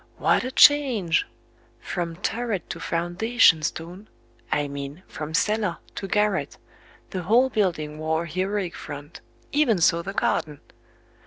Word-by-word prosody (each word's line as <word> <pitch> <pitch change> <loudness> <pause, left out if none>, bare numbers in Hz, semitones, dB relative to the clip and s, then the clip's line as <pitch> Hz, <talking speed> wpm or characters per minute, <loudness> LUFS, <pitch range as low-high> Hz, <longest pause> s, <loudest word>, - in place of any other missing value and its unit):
what - - +2
a 255 - -3
change! 260 - +4 0.5
From 170 -2 -4
turret 220 +2 -3
to - - -6
foundation 175 +2 +3
stone 175 +7 -5 0.4
I 145 -1 +1
mean, 140 +4 -7
from 155 +1 -5
cellar 210 -2 +1 0.2
to 195 - -5
garret, 210 +1 0 0.5
the 185 - -3
whole 240 +8 +3
building 155 -8 -1
wore 160 +1 0
a - - -7
heroic 185 +1 -2
front; 145 +1 -9 0.3
even 285 -8 +3
so 170 0 +3
the 195 +3 -6
garden! 150 -7 -1
180 Hz, 135 wpm, -24 LUFS, 160-215 Hz, 0.5 s, change